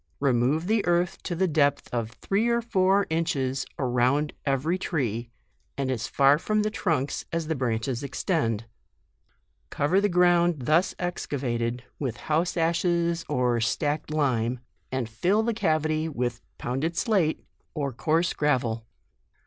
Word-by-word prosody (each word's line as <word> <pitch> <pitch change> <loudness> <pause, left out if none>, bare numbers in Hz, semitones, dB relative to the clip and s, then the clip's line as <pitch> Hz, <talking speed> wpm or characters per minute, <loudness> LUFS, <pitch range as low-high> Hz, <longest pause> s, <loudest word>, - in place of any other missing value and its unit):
Remove 140 +4 +2
the 215 +2 +2
earth 175 0 +1
to 175 - -3
the 190 +2 +2
depth 145 -3 +2
of 115 -2 -1
three 200 - -1
or 235 0 +2
four 200 -3 +2
inches 140 -5 -1
around 130 +3 +1
every 140 +6 +1
tree, 120 - -2 0.5
and 135 -1 -1
as 120 -2 -2
far 140 +1 +4
from 215 +3 +1
the 215 - -1
trunks 160 -9 -1
as 165 -1 -1
the 160 - -1
branch 120 -5 -1
es 125 -3 -2
extend; 135 - -1 1.0
cover 165 +8 +2
the 205 - +2
ground 175 -1 +4
thus 155 +8 +2
excava 140 -9 -3
ted 120 +1 -2 0.2
with 125 -5 -3
house 160 +8 0
ashes 170 0 +1
op 125 -4 +1
slacked 145 +6 -1
lime, 130 -5 0 0.3
and 130 -3 -1
fill 180 - +1
the 230 +1 0
cavity 155 -4 0
with 120 -4 -2 0.2
pounded 135 +7 -2
slate, 185 -9 +1 0.3
or 140 -4 -2
coarse 155 +10 +1
gra 150 -2 +2
vel. 115 -2 -4
150 Hz, 150 wpm, -26 LUFS, 125-175 Hz, 1.0 s, far